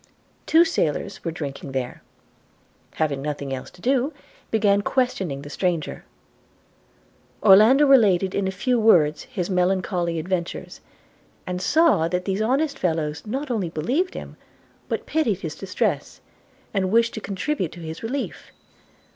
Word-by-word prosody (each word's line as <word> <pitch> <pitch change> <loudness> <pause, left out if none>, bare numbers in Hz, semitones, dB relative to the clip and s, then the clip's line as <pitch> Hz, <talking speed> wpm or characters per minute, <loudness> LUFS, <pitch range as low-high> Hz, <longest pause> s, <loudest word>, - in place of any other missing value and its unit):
Two 330 +2 +6
sailors 200 - -2
were 170 - -2
drinking 140 -4 -6
there, 130 -2 -3 0.9
having 145 -4 -1
nothing 140 -2 -4
else 130 - -6
to 175 - -19
do, 265 +3 +1 0.4
began 205 -2 +3
questioning 195 - -1
the 145 - -9
stranger. 175 -4 -2 1.4
Orlando 220 +9 +7
related 200 -9 +4
in 200 -1 0
a - - -1
few 245 +6 0
words 155 -9 +4
his 190 -9 -4
melancholy 180 -2 0
adventures, 170 +1 -4 0.6
and 180 0 -4
saw 300 - +3
that 180 +1 -2
these 195 +1 -1
honest 275 +5 0
fellows 160 0 -2
not 265 +5 -3
only 200 -8 -1
believed 255 - -1
him, - - -8 0.5
but - - -2
pitied 230 - 0
his 160 -4 -4
distress, 185 +2 -2 0.5
and 190 -2 0
wished 230 +1 +3
to 220 - -5
contribute 200 - -2
to 175 - -11
his 160 0 -7
relief. 260 +5 -5
190 Hz, 140 wpm, -23 LUFS, 165-240 Hz, 1.4 s, Orlando